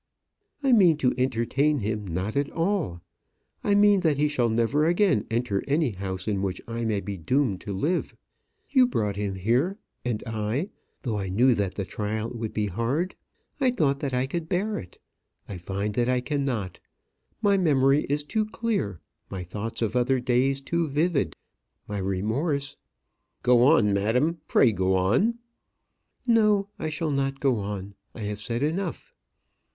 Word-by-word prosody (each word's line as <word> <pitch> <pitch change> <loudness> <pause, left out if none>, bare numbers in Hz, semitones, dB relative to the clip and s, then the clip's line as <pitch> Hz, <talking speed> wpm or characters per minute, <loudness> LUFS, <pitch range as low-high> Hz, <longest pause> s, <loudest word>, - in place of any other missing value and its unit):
"I 270 - +3
mean 185 -9 +6
to 130 -4 +2
entertain 130 +4 +1
him 105 -3 -3
not 90 +5 -3
at 140 0 +1
all. 165 - -1 0.6
I 205 - +3
mean 205 -1 +5
that 160 -6 +2
he 150 +1 +3
shall 125 -5 +1
never 120 +7 +2
again 180 +3 +2
enter 115 -4 0
any 145 -2 +2
house 95 -1 -5
in 100 -3 0
which 95 -2 -2
I 115 0 -3
may 105 -3 0
be 100 -1 -5
doomed 110 - 0
to 100 - -6
live. 155 - -1 0.6
You 260 -3 +5
brought 105 - -1
him 100 -1 -2
here; 125 - +1 0.3
and 120 -4 -2
I 110 - -2 0.3
though 110 -5 -2
I 95 -1 -3
knew 120 +7 +4
that 100 -4 -1
the 100 - -3
trial 110 +3 -3
would 115 -3 -4
be 105 - -1
hard 120 - -1 0.5
I 265 -2 +3
thought 145 - +1
that 140 -2 -2
I 125 0 +1
could 160 +4 -4
bear 205 +4 0
it. 90 - -12 0.5
I 95 -3 -6
find 100 +4 -3
that 120 +3 +1
I 125 0 +2
cannot. 125 - -2 0.6
My 205 -2 +3
memory 140 -4 +3
is 145 +1 0
too 215 +8 -1
clear; 215 - -2 0.3
my 95 -2 -5
thoughts 105 +6 -4
of 115 +1 -1
other 125 +1 +2
days 130 +2 +1
too 170 +4 -1
vivid; 150 +1 0 0.5
my 105 -1 -3
remorse 115 - -1 0.3
" - - -50
"Go 125 -1 +5
on, 110 -5 +5
madam; 125 +12 +1
pray 120 - +5
go 95 -1 +1
on." 120 - +2 0.9
"No, 210 -4 +3
I 155 - -2
shall 155 0 -1
not 135 0 -1
go 135 -4 +2
on. 100 -1 -5 0.2
I 115 - -8
have 105 0 -4
said 115 +4 -2
enough." 190 - -3
125 Hz, 170 wpm, -26 LUFS, 105-155 Hz, 0.9 s, mean